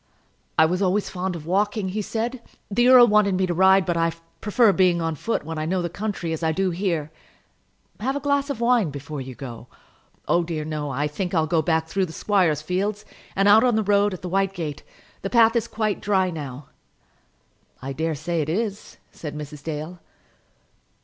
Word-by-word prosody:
"I 160 - +7
was 180 +4 0
always 195 +2 +1
fond 185 0 -3
of 155 -3 -8
walking," 200 +2 0
he 210 +3 -2
said. 230 +4 -3 0.3
"The 240 +5 +3
earl 250 -1 +9
wanted 210 -3 +3
me 190 0 +1
to 175 - -1
ride, 190 +2 +5
but 175 -2 0
I 165 0 +1 0.3
prefer 215 0 +3
being 180 -2 +3
on 165 -1 -1
foot 225 +9 -2
when 160 0 -4
I 155 - -2
know 180 +1 0
the 170 - -3
country, 200 -5 -3
as 160 - -4
I 160 -1 +1
do 185 +3 0
here." 170 -4 -2 0.9
"Have 260 +6 -1
a - - -1
glass 285 0 0
of 280 - -3
wine 235 -6 +3
before 145 +1 -6
you 130 -1 -8
go." 120 -3 -9 0.6
"Oh, 175 0 +3
dear, 160 -2 -4
no. 150 -1 -3
I 140 +2 -1
think 180 +5 -3
I'll 160 -1 +3
go 165 0 +1
back 160 +1 0
through 190 +3 0
the 160 - -10
squire's 175 -8 +1
fields, 200 +5 -2 0.3
and 195 +1 +3
out 215 +2 +7
on 245 -3 +3
the 220 - +1
road 205 -1 +2
at 185 - -13
the - - -3
white 195 +1 +1
gate. 155 -5 -4 0.4
The 195 - -3
path 230 0 +5
is 235 - +1
quite 215 -2 -2
dry 190 -3 +1
now." 140 -3 -7 1.1
"I 135 +1 -5
dare 160 +2 -2
say 165 +3 -2
it 150 - -3
is," 205 +3 -3
said 150 -2 -7
Mrs. 150 -1 -8
Dale. 160 +3 -5
180 Hz, 205 wpm, -23 LUFS, 160-205 Hz, 1.1 s, earl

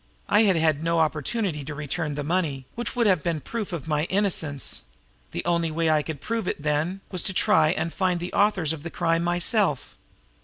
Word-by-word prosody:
I 215 +2 +5
had 195 -3 +4
had 160 -2 +2
no 165 0 +1
opportunity 160 - 0
to 145 +2 -6
return 150 +1 -3
the 145 - -3
money, 150 -5 -1
which 240 +2 -2
would 240 -1 +2
have 185 -6 +4
been 170 -2 -1
proof 215 +5 -5
of 165 -4 -5
my 150 0 +1
innocence; 175 -8 -1 0.5
the - - -5
only 170 -1 +1
way 160 0 +1
I 155 -1 +3
could 150 -2 -6
prove 225 -3 -2
it, 150 - -3
then, 155 +6 0
was 185 -3 0
to 190 - -1
try 155 -1 +4
and 170 -1 -1
find 185 -2 +1
the 175 +1 -5
authors 190 -7 +2
of 160 - -7
the 170 - -6
crime 165 0 0
myself. 175 - +1
165 Hz, 205 wpm, -25 LUFS, 150-185 Hz, 0.5 s, I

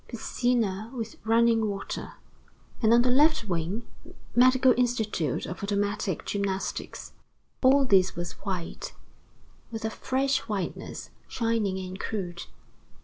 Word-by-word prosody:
Piscina 230 -3 0
with 225 -2 -6
running 225 -1 +4
water." 200 -1 -5 0.7
And, 220 -2 +4
on 240 +1 +6
the 250 - +3
left 295 -2 +4
wing: 180 +5 -2 0.5
"Medical 255 +1 +6
institute 220 - 0
of 180 - -6
automatic 200 -2 -1
gymnastics." 195 -2 -3 0.5
All 270 +1 +5
this 190 -5 +4
was 175 0 -4
white, 195 - -4 0.8
with 225 -1 -5
a 220 - -1
fresh 270 +3 0
whiteness, 200 -5 -4 0.2
shining 225 -5 0
and 185 0 -6
crude. 175 -5 -4
220 Hz, 115 wpm, -27 LUFS, 190-245 Hz, 0.8 s, on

